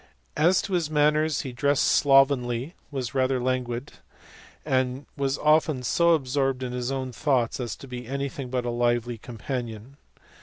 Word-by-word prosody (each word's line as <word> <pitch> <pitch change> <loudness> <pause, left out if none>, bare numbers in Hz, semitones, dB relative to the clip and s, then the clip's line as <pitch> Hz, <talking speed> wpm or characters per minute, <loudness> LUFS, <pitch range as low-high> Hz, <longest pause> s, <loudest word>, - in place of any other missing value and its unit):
As 175 +5 +3
to 195 - -5
his 170 -4 0
manners, 150 0 +2
he 130 - -6
dressed 140 +3 +1
slovenly, 135 -1 +3 0.2
was 130 -5 -4
rather 130 -1 +1
languid, 125 +1 -2 0.7
and 130 +1 0
was 140 0 -1
often 150 -3 +2
so 170 +6 +4
absorbed 135 -2 -1
in 125 - -3
his 125 +1 -3
own 130 -1 -3
thoughts 125 -2 0
as 120 -4 -3
to 135 - -12
be 125 -2 -7
anything 140 0 -4
but 125 -1 -2
a 120 - -1
lively 120 -1 0
companion. 120 +1 -6
130 Hz, 155 wpm, -26 LUFS, 125-145 Hz, 0.7 s, so